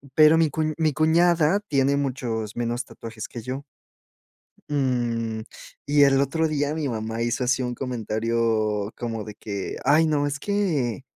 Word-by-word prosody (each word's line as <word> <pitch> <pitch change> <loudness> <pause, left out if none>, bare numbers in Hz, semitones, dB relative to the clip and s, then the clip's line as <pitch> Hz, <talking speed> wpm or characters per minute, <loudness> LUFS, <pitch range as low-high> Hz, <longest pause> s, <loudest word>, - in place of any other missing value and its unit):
pero 155 +1 +7
mi 160 -2 +3
cuñ 155 +1 -1
mi 155 -2 +2
cuñada 165 +3 +3
tiene 140 0 +2
muchos 120 -6 -3
menos 120 +1 -1
tatuajes 110 -1 -8
que 120 - -7
yo. 130 +5 -5 1.1
Mm, 120 -5 -1 0.4
y 145 0 +4
el 135 0 +5
otro 160 +4 +1
día 145 -1 -1
mi 155 -2 -2
mamá 110 -1 -3
hizo 120 +2 0
así 130 +1 +1
un 125 -1 -2
comentario 110 -3 -1
como 115 -3 -4
de 105 - -9
que: 100 -2 -5
"¡Ay 155 +4 +5
no! 145 -2 +1
Es 145 0 -3
que 155 - -1
130 Hz, 155 wpm, -24 LUFS, 115-150 Hz, 1.1 s, pero